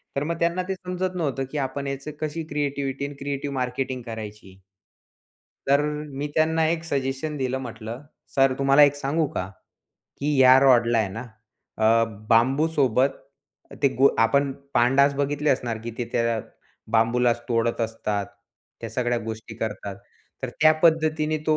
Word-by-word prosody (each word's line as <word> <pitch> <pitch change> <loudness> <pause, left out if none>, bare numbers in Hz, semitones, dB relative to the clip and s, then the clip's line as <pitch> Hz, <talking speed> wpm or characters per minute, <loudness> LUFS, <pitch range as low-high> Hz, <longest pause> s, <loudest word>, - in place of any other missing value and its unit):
तर 140 - 0
मग 165 +2 -3
त्यांना 170 +2 +1
ते 190 - 0
समजत 185 0 -4
नव्हतं 140 -6 -1
की 150 - -4
आपण 140 +1 -3
याचं 140 +2 -5
कशी 155 +1 -3
क्रिएटिव्हिटी 140 -2 -2
आणि 145 0 -7
क्रिएटिव्ह 140 0 -4
मार्केटिंग 130 0 -2
करायची? 105 -4 -8 1.1
तर 140 +1 +4 0.4
मी 145 +2 -2
त्यांना 160 +1 +2
एक 165 0 -1
सजेशन 140 0 -2
दिलं 130 -1 -1
म्हटलं, 115 -1 -7 0.3
"सर 135 -1 +4
तुम्हाला 140 +1 +6
एक 145 0 +4
सांगू 145 +3 0
का? 90 - -2 0.7
की 145 0 0
या 130 0 +8
रॉडला 120 -3 +4
आहे 110 -3 +1
ना 110 +6 -6 0.6
अ, 115 +1 +4 0.3
बांबूसोबत, 135 +1 +3 0.7
ते 140 - +6
गो 135 +1 +7
आपण 140 +5 +3 0.2
पांडास 135 +4 +4
बघितले 145 +1 0
असणार 120 -4 -1
की 115 - -3
ते 120 - -1
त्या 115 -1 +1 0.6
बांबूलाच 120 +1 +3
तोडत 115 0 0
असतात, 105 -3 -2 0.5
त्या 115 - -6
सगळ्या 120 +1 0
गोष्टी 110 0 -7
करतात. 105 -3 -4 0.5
तर - - -2
त्या 155 0 +7
पद्धतीने 155 -1 +2
तो, 155 -1 +3
135 Hz, 150 wpm, -24 LUFS, 115-150 Hz, 1.1 s, या